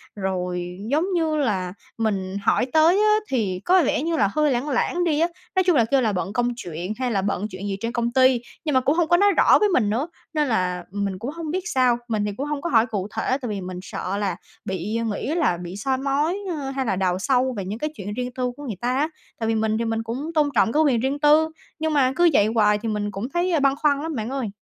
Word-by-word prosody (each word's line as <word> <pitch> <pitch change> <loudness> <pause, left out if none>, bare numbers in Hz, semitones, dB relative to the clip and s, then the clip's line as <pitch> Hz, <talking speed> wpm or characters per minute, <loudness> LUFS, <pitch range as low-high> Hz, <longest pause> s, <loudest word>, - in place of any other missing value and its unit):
rồi 180 -2 -3
giống 310 +4 +2
như 325 -3 +1
là 195 -11 -1 0.2
mình 200 -4 -1
hỏi - - +3
tới 320 +3 +5
á 425 0 +5
thì 200 -8 -1
có 365 -1 +5
vẻ 265 - +1
như 330 0 0
là 200 - +3
hơi 300 -1 +2
lảng 255 +4 -1
lảng 350 +6 0
đi 305 -3 +1
á. 335 - +3 0.3
Nói 375 - +4
chung 355 -2 +3
là 235 -5 +4
kêu 270 +4 +2
là 225 -3 +1
bận 190 +2 -3
công 245 +1 +1
chuyện 175 0 -5
hay 255 -1 0
là 195 -3 +1
bận 200 +1 -1
chuyện 185 +2 -6
gì 195 -1 -2
trên 230 +3 -3
công 235 0 -1
ty, 260 -1 +4 0.2
nhưng 300 - 0
mà 260 - +5
cũng 275 +4 +2
hông 340 -1 +2
có 345 +1 +4
nói 405 +2 +5
rõ - - +6
với 420 - +3
mình 250 - +2
nữa 245 +9 0 0.3
nên 300 -2 +1
là 180 -6 0
mình 200 -1 -3
cũng 250 +6 -4
hông 325 -1 -5
biết 370 +3 -1
sao. 250 -4 +3
Mình 215 -3 -1
thì 205 - -1
cũng 275 - -2
hông 295 -1 -3
có 340 - -2
hỏi 230 -5 +4
cụ 200 -4 -3
thể - - -1
tại 245 - -4
vì 205 -2 -3
mình 180 0 -6
sợ 195 0 -4
là 200 -4 -1 0.3
bị, 190 +4 -3
ờ, 230 - -1
nghĩ 225 +8 -2
là 315 - +2
bị 175 +1 -7
soi 260 +5 0
mói, 285 +7 0
ơ, 295 -6 -3
hay 270 -1 -2
là 215 - 0
đào 185 -1 0
sâu 260 +3 +1
về 195 - -3
những 210 +4 -5
cái 305 - -1
chuyện 205 +1 -6
riêng 250 +2 -4
tư 250 -1 -2
của 290 - -9
người 220 -7 -5
ta 245 +1 0
á. 300 +3 +1 0.3
Tại 225 - -1
vì 225 - +1
mình 220 0 +1
thì 230 - -1
mình 225 0 -1
cũng 260 +8 -4
tôn 300 -2 +3
trọng 225 - +3
cái 310 +4 +3
quyền 265 -6 +3
riêng 270 +4 -1
tư, 305 +2 +5 0.3
nhưng 315 0 0
mà 260 -3 +3
cứ 345 0 +5
vậy 205 - +5
hoài 210 -2 +4
thì 225 +2 -4
mình 205 -1 -2
cũng 200 +6 -5
thấy, 350 +5 0
ờ, 325 - +2
băn 275 0 +3
khoăn 285 -1 +1
lắm 320 -1 -4
bạn 220 0 -3
ơi. 260 -6 -3
245 Hz, 275 wpm, -23 LUFS, 205-295 Hz, 0.3 s, rõ